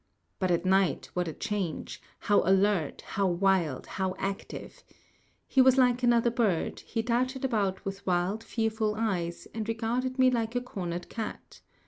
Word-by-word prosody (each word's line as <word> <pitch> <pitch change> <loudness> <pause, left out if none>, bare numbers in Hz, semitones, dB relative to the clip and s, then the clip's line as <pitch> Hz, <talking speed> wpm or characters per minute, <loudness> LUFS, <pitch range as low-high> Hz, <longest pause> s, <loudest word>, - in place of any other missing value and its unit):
But 185 - +1
at 175 +1 +1
night 190 -1 +2
what 180 -1 -1
a 160 - -4
change; 200 -6 -3 0.2
how 205 - +4
alert, 190 -4 +2
how 200 -2 -1
wild, 175 -5 +1
how 190 -1 -2
active! 195 +2 -5 0.6
He 265 - +4
was 260 0 +6
like 250 -1 +4
another 235 -1 +4
bird; 220 -9 0
he 225 - -3
darted 255 +3 0
about 205 -7 0
with 195 0 -5
wild 185 +5 0
fearful 220 -2 -1
eyes, 180 -6 -2
and 220 -1 -4
regarded 240 +3 -1
me 255 -1 +5
like 230 -1 -1
a 245 - +1
cornered 180 -7 -5
cat. 225 -2 -7
210 Hz, 155 wpm, -29 LUFS, 185-235 Hz, 0.6 s, was